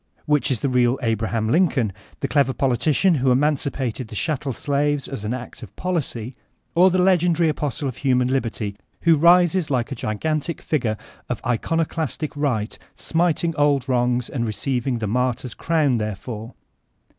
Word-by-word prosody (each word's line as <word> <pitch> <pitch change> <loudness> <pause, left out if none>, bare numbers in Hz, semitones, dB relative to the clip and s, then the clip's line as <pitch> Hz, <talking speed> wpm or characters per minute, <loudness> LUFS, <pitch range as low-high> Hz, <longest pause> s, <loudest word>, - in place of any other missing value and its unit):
Whidi 150 -1 +2
is 130 -5 -1
the - - +1
real 125 0 +2
Abraham 110 -1 0
Lincoln, 130 - +2
— 75 +1 -27
the - - 0
clever 140 -3 +2
politician 140 +8 +2
who 130 - +3
emancipated 135 -3 0
the 110 - -10
chat 150 +4 -1
tel 140 - -3
slaves 145 +2 0
as 135 -7 -6
an 105 - -2
act 125 -1 -6
of 105 -4 -11
policy, 135 -9 -3 0.4
or 180 +3 +6
the 185 - +1
legendary 175 -3 +3
apostle 145 -2 -2
of 130 - -5
human 125 -2 +2
liberty, 115 -6 -2 0.3
who 165 -1 +5
rises 175 +2 +4
like 130 -1 0
a - - -2
gigantic 155 +9 -2
figure 120 -8 -1 0.3
of - - -2
icono 160 +7 0
clastic 160 -1 -3
right 125 -7 -1 0.2
smiting 165 -1 0
old 145 -3 +2
wrongs 125 -1 +1
and 120 -4 -2
receiving 125 +3 -1
the 115 - -3
mar 125 +3 +1
tyr's 125 -1 -8
crown 155 -7 +1
therefor 110 +2 -5
135 Hz, 170 wpm, -22 LUFS, 120-155 Hz, 0.4 s, or